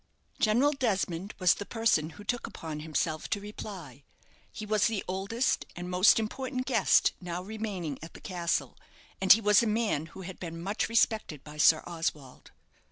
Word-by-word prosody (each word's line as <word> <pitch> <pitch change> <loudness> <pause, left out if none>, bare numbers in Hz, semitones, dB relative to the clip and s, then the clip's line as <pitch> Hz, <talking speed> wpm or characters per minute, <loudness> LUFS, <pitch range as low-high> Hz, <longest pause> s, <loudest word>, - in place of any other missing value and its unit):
General 240 +7 +3
Desmond 200 - -2
was 185 -2 +5
the - - -6
person 215 -9 +1
who 205 - -10
took 245 +3 -2
upon 155 -2 -7
himself 155 +1 -2
to 205 - 0
reply. 200 -7 -9 0.5
He 215 - -7
was 210 -1 +2
the 220 -4 -2
oldest 200 +7 0
and 175 +1 -6
most 180 +3 +6
important 255 +3 -3
guest - - +4
now 175 0 -4
remaining 195 -8 -5
at 165 - -10
the - - -10
castle, 175 -3 -2 0.5
and 190 - +5
he 225 - +9
was 210 0 +5
a 235 - 0
man 210 -8 0
who 180 +4 -11
had 185 0 -8
been 165 -2 -6
much 200 +7 -2
respected 220 - +1
by 150 0 -11
Sir 155 +1 +5
Oswald. 155 -6 -5
190 Hz, 170 wpm, -29 LUFS, 165-220 Hz, 0.5 s, he